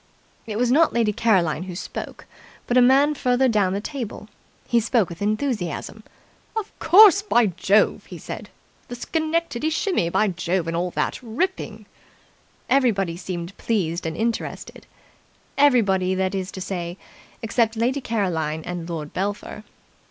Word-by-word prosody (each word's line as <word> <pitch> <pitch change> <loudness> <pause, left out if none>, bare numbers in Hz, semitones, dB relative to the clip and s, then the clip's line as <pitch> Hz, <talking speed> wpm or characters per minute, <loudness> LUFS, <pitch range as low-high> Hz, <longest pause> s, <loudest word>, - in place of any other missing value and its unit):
It 215 -1 -4
was 245 +1 +2
not 320 +4 +4
Lady 225 -3 +1
Caroline 190 -9 +2
who 180 -2 -7
spoke, 180 - -7 0.4
but 245 - -1
a 250 - +7
man 275 +4 +5
further 255 -2 +2
down 205 -6 +2
the 200 - -1
table. 225 -2 -6 0.4
He 235 - +3
spoke 225 -3 +1
with 170 +1 -10
enthusiasm. 215 - -2 0.6
"Of 435 -1 -3
course, 395 +3 +7
by 240 - +3
Jove!" 200 +2 +2
he - - -9
said. - - -8 0.4
"The 245 - -6
Schenectady 315 +1 -1
Shimmy, 320 - 0
by 215 +4 +2
Jove, 180 -1 -2
and 165 - -2
all 175 +2 -1
that! - - -2
Ripping!" 230 - -3 0.8
Everybody 200 -10 +2
seemed 175 +1 -6
pleased 175 -7 -1
and 160 - -4
interested. 230 +1 -4 0.7
Everybody, 200 -10 +3
that 190 +1 -1
is 190 -1 -3
to 190 - -7
say, 175 -1 -4 0.5
except 225 0 +1
Lady 255 +5 0
Caroline 165 -10 -2
and 175 -1 -5
Lord 155 -3 -5
Belpher. 205 +2 -4
215 Hz, 145 wpm, -23 LUFS, 180-250 Hz, 0.8 s, a